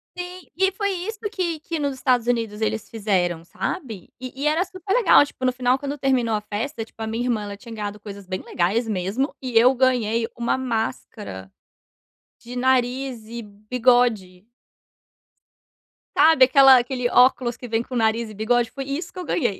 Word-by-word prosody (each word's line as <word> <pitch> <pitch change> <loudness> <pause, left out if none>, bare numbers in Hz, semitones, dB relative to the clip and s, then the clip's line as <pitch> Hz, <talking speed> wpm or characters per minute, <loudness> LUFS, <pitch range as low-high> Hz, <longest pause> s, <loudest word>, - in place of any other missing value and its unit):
Sime 365 +1 -2
foi 405 -2 0
isso 390 +4 -5
que 350 -6 -2
que 330 +1 -4
nos 285 -2 -1
Estados 250 -2 +1
Unidos 225 -3 -1
eles 220 0 -1
fizeram, 185 -6 -1
sabe. 200 - -5
E 260 +2 -7
e - - +2
era 315 +4 +2
super 380 0 -5
legal, 445 -10 +6
tipo, 270 - -12
no 255 - +3
final 250 +1 +1
quando 285 +1 -4
terminou 255 -5 +1
a 210 - -2
festa, 225 +4 -4
tipo, 225 - -15
a 220 - -3
minha 225 +2 -2
irmã 230 -4 0
ela 205 0 -7
tinha 230 +3 -11
ganhado 210 -1 -5
coisas 200 -2 -10
bem 185 0 -4
legais 205 +7 0
mesmo 210 - -2
e 250 -3 -1
eu 245 +3 +6
ganhei 235 -3 +1
uma 235 +2 0
máscara, 220 - -4 0.9
de 240 +1 -10
nariz 255 -1 0
e 235 +1 -6
bigode. 215 -3 0 1.7
Sabe 315 -5 +6
aquela 270 0 +7
aquele 245 0 -1
óculos 250 -1 +3
que 250 - -8
vem 225 0 0
com 250 +2 -7
nariz 225 0 +1
e - - -10
bigode? 235 +2 +1
Foi 275 +2 -5
isso 280 +6 -4
que - - -17
eu 360 - -5
ganhei. 235 - -1
245 Hz, 180 wpm, -23 LUFS, 220-270 Hz, 1.7 s, aquela